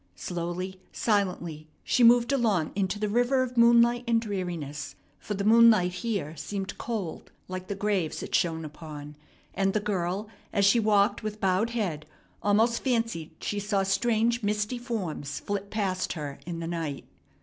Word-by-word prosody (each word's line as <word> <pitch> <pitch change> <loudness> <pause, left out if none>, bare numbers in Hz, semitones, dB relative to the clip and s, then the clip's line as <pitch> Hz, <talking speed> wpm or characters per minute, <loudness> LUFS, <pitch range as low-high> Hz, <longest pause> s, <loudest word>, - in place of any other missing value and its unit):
Slowly, 180 +2 -4
silently, 180 -7 -1 0.2
she 250 - +2
moved 240 +3 +6
along 215 - +1
into 195 0 0
the 210 0 -1
river 245 +4 +2
of 250 -1 -5
moonlight 235 +1 +5
and 230 -1 +3
dreariness; 175 -9 -4 0.2
for 210 - -4
the 200 - -2
moonlight 220 -4 +6
here 180 -5 -3
seemed 190 +5 -4
cold, 215 -8 -4 0.2
like 185 0 -6
the 200 - -3
graves 195 -5 -1
it - - -8
shone 160 -2 +1
upon, 150 -1 -9 0.4
and 195 0 +1
the - - +4
girl, 200 0 -2 0.2
as 200 -1 +2
she 215 +4 +5
walked 210 -1 +3
with 215 -1 -5
bowed 195 +4 +2
head, 180 -10 -3 0.3
almost 220 +3 +2
fancied 230 - 0
she 205 - -2
saw 200 -1 0
strange 230 +4 +1
misty 210 +3 -1
forms 180 - -4
flit 200 0 -4
past 195 -4 -1
her 145 -4 -6
in 170 -1 -4
the 165 - -4
night. 165 -5 -4
200 Hz, 160 wpm, -28 LUFS, 175-225 Hz, 0.4 s, moved